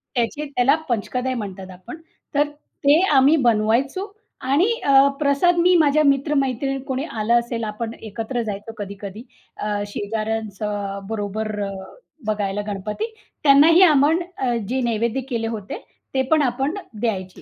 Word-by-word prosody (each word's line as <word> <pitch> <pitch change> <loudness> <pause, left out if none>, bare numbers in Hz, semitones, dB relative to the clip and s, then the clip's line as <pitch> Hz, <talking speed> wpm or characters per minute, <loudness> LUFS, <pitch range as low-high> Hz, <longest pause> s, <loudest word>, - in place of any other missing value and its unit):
त्याचे 245 +5 -1
त्याला 275 0 +2
पंचकदय 250 +3 -1
म्हणतात 195 -4 -6
आपण. 185 - -10 0.4
तर 290 +1 +3 0.4
ते 290 +4 +6 0.2
आम्ही 275 +4 +6
बनवायचो 235 - +1 0.4
आणि 290 - +2
अ, 275 0 +6
प्रसाद 295 +5 +3
मी 360 +1 +5
माझ्या 305 -1 +4
मित्र-मैत्रिणी 275 -1 +1
कोणी 265 +1 -2
आलं 235 -2 +1
असेल, 235 -1 -4
आपण 220 +2 -4
एकत्र 225 +3 -4
जायचो 210 +1 -6
कधी-कधी 200 +2 -7 0.3
अ, 210 - -4 0.2
शेजाऱ्यांचं 205 -1 -3
बरोबर 215 0 -3
अ, 200 - -3 0.6
बघायला 205 -1 -1
गणपती. 210 - -4 0.3
त्यांनाही 305 +5 +7
आपण 305 0 +5 0.5
जे 260 +1 0
नैवेद्य 235 +2 0
केले 230 -2 -1
होते 215 -3 -6 0.3
ते 265 - +3
पण 310 -1 +5
आपण 270 +4 0 0.3
द्यायचे. 190 -5 -3
235 Hz, 130 wpm, -22 LUFS, 210-280 Hz, 0.6 s, त्यांनाही